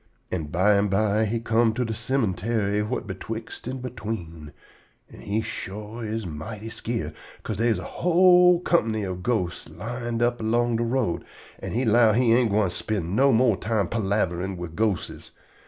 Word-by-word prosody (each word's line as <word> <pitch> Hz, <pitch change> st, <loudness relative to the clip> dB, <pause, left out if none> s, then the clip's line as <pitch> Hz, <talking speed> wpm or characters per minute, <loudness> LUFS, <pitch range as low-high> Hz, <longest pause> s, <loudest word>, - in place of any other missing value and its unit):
An' 85 Hz, -4 st, -2 dB
bimeby 100 Hz, +4 st, +2 dB
he 115 Hz, +2 st, -1 dB
come 115 Hz, 0 st, +2 dB
to 125 Hz, -, 0 dB
de 110 Hz, -, -3 dB
cemuntary 110 Hz, -3 st, 0 dB
whut 110 Hz, +5 st, -3 dB
betwixt 110 Hz, +4 st, -7 dB
an' 130 Hz, 0 st, -4 dB
between, 100 Hz, -11 st, -6 dB, 0.6 s
an' -, -, -13 dB
he 105 Hz, +2 st, -1 dB
shore 105 Hz, +5 st, -6 dB
is 110 Hz, 0 st, -3 dB
mighty 105 Hz, +8 st, -6 dB
skeered, 115 Hz, 0 st, -3 dB, 0.3 s
'ca'se 110 Hz, -, -4 dB
dey 115 Hz, +3 st, +2 dB
is 115 Hz, -, +2 dB
a -, -, -6 dB
whole 180 Hz, 0 st, +5 dB
comp'ny 110 Hz, -13 st, +1 dB
of 90 Hz, -2 st, -4 dB
ghostes 90 Hz, -6 st, -2 dB
lined 120 Hz, +3 st, -3 dB
up 120 Hz, 0 st, +1 dB
along 120 Hz, +1 st, +1 dB
de 120 Hz, -, 0 dB
road, 115 Hz, -6 st, 0 dB, 0.4 s
an' -, -, -5 dB
he 125 Hz, +3 st, 0 dB
'low 115 Hz, -1 st, +5 dB
he 120 Hz, 0 st, +4 dB
ain't 120 Hz, -1 st, +3 dB
gwine 100 Hz, -2 st, +2 dB
spind 95 Hz, -1 st, -2 dB
no 135 Hz, +3 st, +5 dB
more 120 Hz, -2 st, +4 dB
time 105 Hz, -2 st, -1 dB
palaverin' 95 Hz, -3 st, -1 dB
wid 85 Hz, -2 st, -7 dB
ghostes. 105 Hz, -4 st, -2 dB
110 Hz, 165 wpm, -25 LUFS, 100-120 Hz, 0.6 s, whole